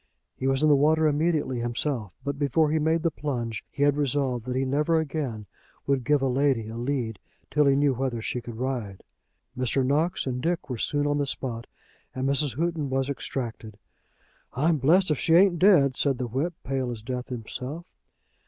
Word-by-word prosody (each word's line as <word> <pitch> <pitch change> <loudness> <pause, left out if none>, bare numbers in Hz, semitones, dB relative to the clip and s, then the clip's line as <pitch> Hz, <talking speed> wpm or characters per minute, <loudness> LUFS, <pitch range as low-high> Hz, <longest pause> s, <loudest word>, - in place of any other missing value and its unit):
He 130 - -3
was 135 +2 +2
in - - +5
the 150 - +6
water 155 +3 +3
immediately 150 -4 +1
himself, 120 -2 -2
but 140 0 -3
before 150 +2 +2
he 160 - +2
made 160 +1 +1
the 165 - +2
plunge 120 -8 -4
he 145 - -2
had 145 -1 +4
resolved 135 -4 -1
that 125 - -2
he 130 +1 +1
never 150 +5 +2
again 140 -9 -3 0.4
would 135 -2 +1
give 145 +2 +2
a - - +2
lady 130 -3 +1
a 115 - -7
lead 120 -3 -2 0.3
till 150 -1 +3
he 135 - +5
knew 140 -1 +3
whether 130 -2 -2
she 120 +2 -3
could 120 -1 -8
ride. 120 -6 -4 0.5
Mr. 130 +1 +1
Knox 155 +7 +1
and 125 -1 -2
Dick 160 -2 -2
were 120 - -4
soon 145 0 0
on 145 0 +1
the 140 - 0
spot, 120 -4 -3 0.5
and 130 +1 -1
Mrs. 140 -2 +1
Houghton 165 -3 -1
was 135 +1 0
extracted. 115 -6 -5 0.8
"I'm 155 +5 +2
blessed 160 +6 +3
if 150 - 0
she 165 - +3
ain't 180 -1 +5
dead," 155 -9 +5
said 135 -1 +1
the 125 - -2
whip, 140 +9 -2
pale 130 -1 -2
as 115 -3 -5
death 125 0 -4
himself. 125 +7 -6
135 Hz, 195 wpm, -26 LUFS, 125-150 Hz, 0.8 s, the